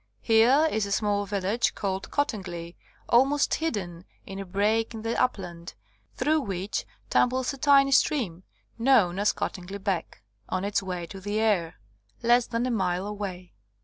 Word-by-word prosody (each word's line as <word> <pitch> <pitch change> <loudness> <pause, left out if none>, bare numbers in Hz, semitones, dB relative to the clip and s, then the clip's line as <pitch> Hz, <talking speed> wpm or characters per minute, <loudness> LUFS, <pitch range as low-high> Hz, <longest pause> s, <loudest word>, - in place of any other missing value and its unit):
Here 245 +8 +5
is 215 -2 0
a - - -6
small 205 0 0
village 200 +4 0
called 195 -1 -3
Cottingley, 180 -11 -3 0.3
almost 270 +4 +3
hidden 190 - -3 0.2
in 195 0 -7
a 195 - -5
break 215 +5 0
in 220 - -7
the 230 +1 -1
upland, 175 -8 -3 0.4
through 310 +1 +1
which 195 -3 -3 0.2
tumbles 255 +1 +2
a - - -8
tiny 275 0 +5
stream, 235 - +2 0.4
known 220 -8 +4
as 205 - +3
Cottingley 190 +1 -5
Beck, 190 - -3 0.3
on 185 +1 -1
its 205 0 0
way 180 -3 -4
to 195 +3 -10
the 205 +2 -2
Aire, 185 -7 +1 0.5
less 240 +1 +4
than 235 0 -1
a 255 - -1
mile 185 -4 0
away. 195 -4 -6
205 Hz, 155 wpm, -27 LUFS, 185-240 Hz, 0.5 s, Here